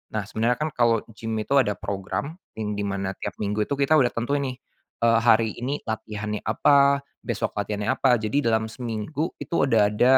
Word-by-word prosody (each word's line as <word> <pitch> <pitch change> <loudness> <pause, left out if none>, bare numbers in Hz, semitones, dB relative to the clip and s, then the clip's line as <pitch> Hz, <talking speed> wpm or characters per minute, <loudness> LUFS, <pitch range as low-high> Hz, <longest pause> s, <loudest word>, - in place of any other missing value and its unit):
Nah, 110 - 0
sebenarnya 115 +4 0
kan 155 +3 -1
kalau 115 -2 +2
gim 110 0 -4
itu 110 +5 -2
ada 105 -6 +1
program 100 +9 -4 0.2
yang 105 -1 -2
di 105 - -3
mana 100 -1 -2
tiap - - -6
minggu 105 +1 -1
itu 140 - -2
kita 140 +2 +2
udah 135 -6 +5
tentuin 140 +6 -1
nih, 130 -2 -3 0.5
eee, 115 -1 +5
hari 115 -2 +4
ini 135 +4 -4
latihannya 105 -1 -4
apa, 140 +5 +3 0.2
besok - - -2
latihannya 105 +3 -1
apa, 130 -2 +3
jadi 110 +6 0
dalam 110 -1 +2
seminggu 120 +7 -4
itu - - -8 0.2
udah 105 -3 +4
ada 125 +5 +5
115 Hz, 190 wpm, -25 LUFS, 105-135 Hz, 0.5 s, udah